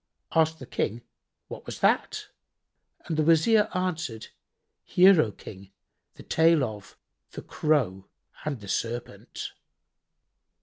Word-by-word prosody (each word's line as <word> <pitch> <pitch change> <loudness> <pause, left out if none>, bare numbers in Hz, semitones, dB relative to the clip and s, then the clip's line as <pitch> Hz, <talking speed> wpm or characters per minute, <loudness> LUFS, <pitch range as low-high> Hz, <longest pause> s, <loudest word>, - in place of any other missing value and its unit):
Asked 160 0 +3
the 130 - -10
King 120 0 -3 0.4
"What - - -10
was - - -6
that?"; - - +1 0.8
and 160 - -3
the 155 - +3
Wazir 205 +7 +4
answered, 165 -11 -3 0.5
"Hear, 185 -2 +6
O 110 - -1
King, 95 -1 -12 0.4
the - - -12
tale 160 -2 +3
of 105 -5 -7 0.4
The - - -7
Crow 125 -12 0 0.4
and 140 -7 -4
the 100 - -10
Serpent. 115 +4 -4
150 Hz, 120 wpm, -27 LUFS, 110-165 Hz, 0.8 s, Hear